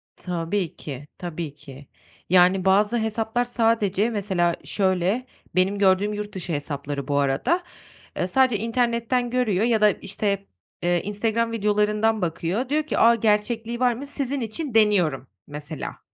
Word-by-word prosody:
Tabii 175 Hz, 0 st, -3 dB
ki, 145 Hz, -1 st, -8 dB
tabii 170 Hz, -4 st, -5 dB
ki. 140 Hz, -2 st, -13 dB, 0.4 s
Yani, 185 Hz, +1 st, +4 dB
bazı 205 Hz, +4 st, +3 dB
hesaplar 220 Hz, +2 st, -1 dB
sadece 225 Hz, -3 st, +1 dB
mesela 190 Hz, -6 st, 0 dB
şöyle, 190 Hz, +4 st, 0 dB, 0.3 s
benim 190 Hz, +2 st, +2 dB
gördüğüm 200 Hz, +1 st, +3 dB
yurt 210 Hz, 0 st, -5 dB
dışı 180 Hz, -2 st, -4 dB
hesapları 145 Hz, -1 st, -4 dB
bu 145 Hz, -1 st, 0 dB
arada. 140 Hz, -, +1 dB, 0.5 s
Iıı, 180 Hz, -, 0 dB
sadece 255 Hz, +2 st, +3 dB
internetten 235 Hz, +1 st, 0 dB
görüyor 230 Hz, -5 st, +1 dB
ya 230 Hz, -2 st, +2 dB
da, 210 Hz, -, +7 dB
işte, 200 Hz, +1 st, -3 dB, 0.4 s
eee, 175 Hz, 0 st, +2 dB
Instagram 225 Hz, +3 st, -1 dB
videolarından 210 Hz, 0 st, +1 dB
bakıyor, 180 Hz, +8 st, -2 dB
diyor 305 Hz, +2 st, +1 dB
ki, 305 Hz, -, -3 dB
"A, 235 Hz, +1 st, +6 dB
gerçekliği 225 Hz, +2 st, 0 dB
var 250 Hz, -1 st, +3 dB
mı, 255 Hz, +5 st, -7 dB
sizin 280 Hz, -1 st, -2 dB
için 250 Hz, +5 st, -3 dB
deniyorum." 185 Hz, -, +3 dB, 0.2 s
mesela. 150 Hz, +1 st, -6 dB
210 Hz, 140 wpm, -24 LUFS, 175-230 Hz, 0.5 s, da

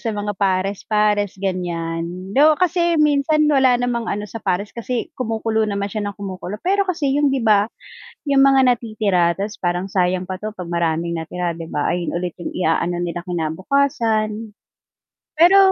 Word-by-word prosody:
sa 225 Hz, -3 st, -3 dB
mga 205 Hz, 0 st, -2 dB
pares-pares, 205 Hz, +1 st, +1 dB
ganiyan. 180 Hz, -1 st, -3 dB
Though, 300 Hz, +4 st, +5 dB
kasi 345 Hz, -1 st, +2 dB
minsan 300 Hz, 0 st, +3 dB
wala 265 Hz, -3 st, +4 dB
namang 240 Hz, -2 st, -1 dB
ano 205 Hz, +1 st, -2 dB
sa 225 Hz, -, -7 dB
pares 200 Hz, +2 st, -1 dB
kasi 235 Hz, 0 st, -4 dB
kumukulo 220 Hz, -2 st, 0 dB
naman 200 Hz, 0 st, -2 dB
siya 215 Hz, -, -3 dB
nang 205 Hz, -, -5 dB
kumukulo, 195 Hz, 0 st, -6 dB
pero 395 Hz, +2 st, +1 dB
kasi 310 Hz, -6 st, 0 dB
yung 290 Hz, -1 st, +3 dB
'di 265 Hz, -3 st, 0 dB
ba, 210 Hz, -1 st, +4 dB, 0.6 s
yung 275 Hz, -2 st, +3 dB
mga 270 Hz, -1 st, +5 dB
natitira 215 Hz, -8 st, +1 dB
ta's 205 Hz, +2 st, -4 dB
parang, 175 Hz, +1 st, 0 dB
"Sayang 185 Hz, -1 st, +1 dB
pa 185 Hz, 0 st, -6 dB
'to 215 Hz, 0 st, -5 dB
'pag 180 Hz, -4 st, -7 dB
maraming 170 Hz, 0 st, 0 dB
natira," 170 Hz, +1 st, -3 dB
'di 165 Hz, -1 st, -8 dB
ba? 145 Hz, -, -1 dB
Ayun 175 Hz, -1 st, -2 dB
ulit 175 Hz, -1 st, -3 dB
yung -, -, -5 dB
iaano 175 Hz, 0 st, 0 dB
nila 175 Hz, 0 st, -3 dB
kinabukasan. 215 Hz, -, 0 dB, 0.9 s
Pero 355 Hz, +4 st, +7 dB
205 Hz, 165 wpm, -20 LUFS, 180-245 Hz, 0.9 s, Pero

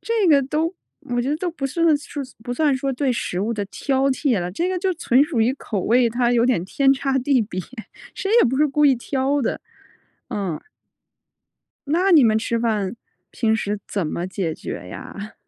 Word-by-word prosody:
这 450 Hz, -4 st, 0 dB
个 280 Hz, -3 st, +5 dB
都 310 Hz, +5 st, -1 dB, 0.3 s
我 245 Hz, 0 st, -2 dB
觉 255 Hz, -, -2 dB
得 295 Hz, -, 0 dB
都 355 Hz, +2 st, -2 dB
不 280 Hz, -5 st, -3 dB
算 330 Hz, +2 st, +2 dB
是 290 Hz, 0 st, -7 dB, 0.2 s
不 245 Hz, -, -4 dB
算 295 Hz, 0 st, +2 dB
说 270 Hz, +1 st, -2 dB
对 260 Hz, 0 st, 0 dB
食 185 Hz, -5 st, -3 dB
物 225 Hz, +3 st, -1 dB
的 210 Hz, -2 st, -2 dB
挑 270 Hz, +5 st, 0 dB
剔 260 Hz, -5 st, +1 dB
了。 175 Hz, -, -3 dB
这 335 Hz, -, -1 dB
个 370 Hz, -1 st, -1 dB
就 375 Hz, 0 st, 0 dB
纯 275 Hz, -5 st, +3 dB
属 290 Hz, -8 st, -1 dB
于 235 Hz, +4 st, +3 dB
口 215 Hz, -7 st, -4 dB
味， 240 Hz, +5 st, +3 dB
它 240 Hz, +1 st, +1 dB
有 235 Hz, -1 st, +3 dB
点 240 Hz, -10 st, +2 dB
天 270 Hz, +7 st, +3 dB
差 270 Hz, 0 st, 0 dB
地 260 Hz, -1 st, +2 dB
别， 185 Hz, -3 st, -5 dB, 0.5 s
谁 390 Hz, -, -3 dB
也 -, -, +4 dB
不 260 Hz, -, -1 dB
是 300 Hz, +1 st, +4 dB
故 295 Hz, +1 st, +1 dB
意 275 Hz, -, +5 dB
挑 270 Hz, +3 st, -1 dB
的。 -, -, -2 dB, 0.7 s
嗯。 190 Hz, -6 st, -3 dB, 1.3 s
那 360 Hz, +6 st, +2 dB
你 310 Hz, -7 st, +7 dB
们 220 Hz, -1 st, +4 dB
吃 230 Hz, +1 st, -1 dB
饭， 215 Hz, -2 st, -1 dB, 0.4 s
平 220 Hz, -2 st, +1 dB
时 210 Hz, -1 st, -2 dB
怎 195 Hz, -5 st, -2 dB
么 170 Hz, +4 st, -3 dB
解 185 Hz, -4 st, -3 dB
决 90 Hz, -, -7 dB
呀？ 205 Hz, -, -8 dB
255 Hz, 215 characters per minute, -22 LUFS, 220-290 Hz, 1.3 s, 你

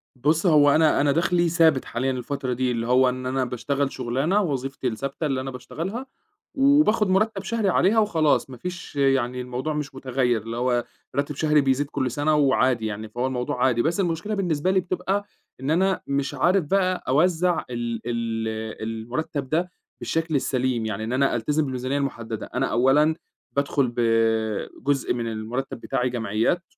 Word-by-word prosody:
بُصّ، 150 Hz, +7 st, +1 dB
هو 150 Hz, -4 st, +6 dB
أنا 155 Hz, -2 st, +4 dB
أنا 145 Hz, 0 st, +3 dB
دخلي 170 Hz, +2 st, +2 dB
ثابت 160 Hz, -5 st, +3 dB
حاليًا 130 Hz, +2 st, -1 dB
الفترة 130 Hz, +1 st, -3 dB
دي، 125 Hz, +1 st, 0 dB
اللي 115 Hz, -1 st, -2 dB
هو 130 Hz, +1 st, +4 dB
إن 130 Hz, 0 st, -5 dB
أنا 130 Hz, 0 st, 0 dB
باشتغل 135 Hz, +3 st, -2 dB
شغلانة 135 Hz, -, 0 dB
وظيفتي 135 Hz, -6 st, -2 dB
الثابتة 140 Hz, +6 st, -3 dB
اللي 135 Hz, -3 st, 0 dB
أنا 135 Hz, 0 st, -5 dB
باشتغلها 165 Hz, -, -5 dB, 0.5 s
وباخد 270 Hz, -7 st, +4 dB
مرتب 195 Hz, +1 st, +1 dB
شهري 215 Hz, 0 st, 0 dB
عليها 195 Hz, +5 st, +3 dB
وخلاص، 160 Hz, -10 st, +2 dB
مافيش 170 Hz, +7 st, -7 dB
يعني 135 Hz, -3 st, +1 dB
الموضوع 125 Hz, +5 st, -3 dB
مش 150 Hz, -2 st, -4 dB
متغيّر 130 Hz, -3 st, 0 dB
اللي 115 Hz, +2 st, -6 dB
هو 120 Hz, 0 st, +1 dB, 0.3 s
راتب 140 Hz, +1 st, -1 dB
شهري 150 Hz, +1 st, +3 dB
بيزيد 135 Hz, +1 st, +1 dB
كل 130 Hz, -4 st, -1 dB
سنة 145 Hz, +4 st, +1 dB
وعادي 130 Hz, -5 st, +2 dB
يعني، 110 Hz, 0 st, -4 dB
فهو 120 Hz, +4 st, -2 dB
الموضوع 125 Hz, -1 st, -1 dB
عادي، 120 Hz, -3 st, +2 dB
بس 165 Hz, +9 st, 0 dB
المشكلة 180 Hz, +3 st, -1 dB
بالنسبة 180 Hz, -3 st, 0 dB
لي 190 Hz, -, +3 dB
بتبقى 185 Hz, +3 st, -2 dB, 0.3 s
إن 135 Hz, +3 st, -2 dB
أنا 190 Hz, +3 st, +2 dB
مش 140 Hz, 0 st, -1 dB
عارف 185 Hz, +1 st, +2 dB
بقى 185 Hz, +2 st, +1 dB
أوزَّع 175 Hz, +5 st, +2 dB
ال 120 Hz, -2 st, -3 dB
ال 115 Hz, -1 st, -2 dB, 0.4 s
المُرتَّب 120 Hz, +6 st, -4 dB
ده 170 Hz, +4 st, 0 dB, 0.3 s
بالشكل 165 Hz, -1 st, -1 dB
السليم، 130 Hz, -3 st, 0 dB
يعني 110 Hz, 0 st, -3 dB
إن 115 Hz, +3 st, -3 dB
أنا 135 Hz, 0 st, +2 dB
ألتزِم 150 Hz, +7 st, 0 dB
بالميزانية 130 Hz, 0 st, -2 dB
المحدَّدة 115 Hz, -6 st, -4 dB
أنا 130 Hz, +1 st, +1 dB
أولًا 145 Hz, +6 st, +3 dB, 0.4 s
بادخُل 140 Hz, -1 st, +1 dB
ب -, -, -3 dB, 0.8 s
جزء 140 Hz, -1 st, +1 dB
من 120 Hz, -1 st, -3 dB
المُرتَّب 115 Hz, +4 st, -4 dB
بتاعي 125 Hz, +2 st, -1 dB
جمعيات، 115 Hz, -, 0 dB
135 Hz, 165 wpm, -24 LUFS, 125-165 Hz, 0.8 s, هو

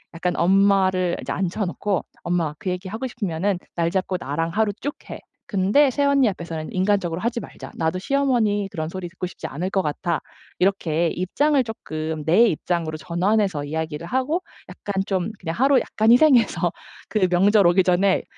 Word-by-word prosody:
약간 180 Hz, +1 st, -1 dB
엄마를 190 Hz, -1 st, +3 dB
인제 -, -, -5 dB
앉혀 190 Hz, +3 st, -1 dB
놓고 190 Hz, +1 st, -2 dB, 0.2 s
"엄마 170 Hz, -3 st, 0 dB
그 190 Hz, -, -3 dB
얘기 180 Hz, +1 st, -4 dB
하고 225 Hz, +6 st, -4 dB
싶으면은 200 Hz, -5 st, -2 dB, 0.2 s
날 170 Hz, -1 st, +1 dB
잡고 190 Hz, 0 st, -1 dB
나랑 165 Hz, +4 st, -2 dB
하루 210 Hz, +2 st, +1 dB
쭉 290 Hz, +2 st, -3 dB
해. -, -, -6 dB, 0.3 s
근데 205 Hz, +9 st, +3 dB
새언니 280 Hz, -1 st, +3 dB
앞에서는 165 Hz, -4 st, -6 dB
인간적으로 185 Hz, -3 st, 0 dB
하지 235 Hz, +2 st, -1 dB
말자. -, -, -10 dB
나도 165 Hz, +2 st, -1 dB
시어머니 230 Hz, -5 st, +1 dB
그런 155 Hz, -3 st, -4 dB
소리 185 Hz, 0 st, -6 dB
듣고 180 Hz, +1 st, -5 dB
싶지 180 Hz, -, -8 dB
않을 175 Hz, +7 st, -3 dB
것 195 Hz, 0 st, +1 dB
같아." 165 Hz, +1 st, -2 dB, 0.4 s
이렇게 175 Hz, -4 st, +1 dB
입장을 275 Hz, -, +1 dB
쪼끔 160 Hz, -8 st, -5 dB
내 200 Hz, +9 st, +5 dB
입장으로 165 Hz, -3 st, -2 dB
전환해서 180 Hz, 0 st, 0 dB
이야기를 160 Hz, +1 st, -4 dB
하고 260 Hz, -, 0 dB, 0.3 s
약간 200 Hz, -2 st, -3 dB
좀 190 Hz, +1 st, -1 dB
그냥 165 Hz, -2 st, -4 dB
하루 270 Hz, +1 st, +4 dB
약간 220 Hz, +1 st, +1 dB
희생해서 240 Hz, -, +4 dB, 0.4 s
그 205 Hz, -4 st, +2 dB
명절 195 Hz, +3 st, +4 dB
오기 180 Hz, +2 st, +4 dB
전에 185 Hz, +2 st, +2 dB
185 Hz, 360 characters per minute, -23 LUFS, 170-215 Hz, 0.4 s, 내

